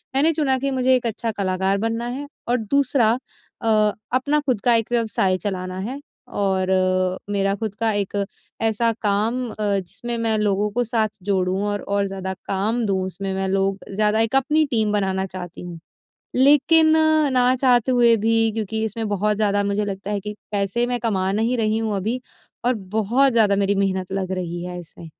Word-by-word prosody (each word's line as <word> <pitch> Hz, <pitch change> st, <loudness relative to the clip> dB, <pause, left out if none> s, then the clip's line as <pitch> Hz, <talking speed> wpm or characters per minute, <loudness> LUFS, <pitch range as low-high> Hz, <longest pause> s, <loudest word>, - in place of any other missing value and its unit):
मैंने 305 Hz, +4 st, +4 dB
चुना 285 Hz, -4 st, +1 dB
कि 275 Hz, +1 st, -1 dB
मुझे 260 Hz, 0 st, +3 dB
एक 250 Hz, -, -1 dB
अच्छा 225 Hz, 0 st, -2 dB
कलाकार 190 Hz, -1 st, 0 dB
बनना 225 Hz, +3 st, -2 dB
है। 270 Hz, +4 st, -5 dB, 0.2 s
और 245 Hz, +1 st, +2 dB
दूसरा 250 Hz, 0 st, +2 dB, 0.5 s
अ, -, -, -3 dB, 0.5 s
अपना 285 Hz, +4 st, +2 dB
खुद 250 Hz, -7 st, 0 dB
का 240 Hz, -, +6 dB
एक 225 Hz, 0 st, 0 dB
व्यवसाय 220 Hz, -5 st, +1 dB
चलाना 185 Hz, -2 st, -4 dB
है 270 Hz, +2 st, -6 dB, 0.3 s
और 190 Hz, -4 st, 0 dB, 0.6 s
मेरा 195 Hz, -1 st, +1 dB
खुद 210 Hz, -1 st, -4 dB
का 225 Hz, -1 st, +2 dB
एक 205 Hz, 0 st, -2 dB, 0.4 s
ऐसा 225 Hz, +1 st, +2 dB
काम 220 Hz, +5 st, 0 dB
अ, -, -, -10 dB
जिसमें 205 Hz, +4 st, -2 dB
मैं 225 Hz, -1 st, +1 dB
लोगों 210 Hz, 0 st, +1 dB
को 245 Hz, +3 st, 0 dB
साथ 220 Hz, -2 st, -1 dB
जोड़ूँ 190 Hz, -1 st, 0 dB
और-और 200 Hz, -1 st, -1 dB
ज़्यादा 190 Hz, -1 st, -4 dB
काम 215 Hz, +5 st, 0 dB
दूँ। 190 Hz, -2 st, 0 dB
उसमें 190 Hz, +1 st, -4 dB
मैं 190 Hz, 0 st, -2 dB
लोग 195 Hz, 0 st, 0 dB
ज़्यादा 210 Hz, +2 st, +2 dB
एक 225 Hz, +3 st, 0 dB
अपनी 300 Hz, +4 st, +3 dB
टीम 220 Hz, -3 st, +1 dB
बनाना 190 Hz, -2 st, 0 dB
चाहती 180 Hz, -2 st, -8 dB
हूँ, 175 Hz, -2 st, -8 dB, 0.6 s
लेकिन 295 Hz, +4 st, +5 dB, 0.5 s
ना 250 Hz, 0 st, +4 dB
चाहते 250 Hz, -1 st, +3 dB
हुए 240 Hz, -2 st, +5 dB
भी 225 Hz, +2 st, +1 dB, 0.2 s
क्योंकि 220 Hz, 0 st, -3 dB
इसमें 220 Hz, +1 st, -3 dB
बहुत 210 Hz, +1 st, 0 dB
ज़्यादा 205 Hz, -1 st, +2 dB
मुझे 200 Hz, +1 st, 0 dB
लगता 200 Hz, 0 st, -5 dB
है 205 Hz, -, -1 dB
कि 210 Hz, +1 st, -5 dB, 0.2 s
पैसे 200 Hz, +3 st, 0 dB
मैं 245 Hz, 0 st, -1 dB
कमा 195 Hz, -5 st, 0 dB
नहीं 225 Hz, +4 st, 0 dB
रही 220 Hz, -1 st, +1 dB
हूँ 220 Hz, -2 st, -1 dB
अभी 220 Hz, +6 st, -2 dB, 0.5 s
और 250 Hz, -, +3 dB, 0.2 s
बहुत 245 Hz, +6 st, +3 dB
ज़्यादा 215 Hz, -4 st, +4 dB
मेरी 200 Hz, 0 st, +1 dB
मेहनत 190 Hz, -2 st, -1 dB
लग 190 Hz, -1 st, -2 dB
रही 175 Hz, -2 st, -4 dB
है 180 Hz, 0 st, -6 dB
इसमें 170 Hz, 0 st, -12 dB
210 Hz, 180 wpm, -22 LUFS, 195-240 Hz, 0.6 s, का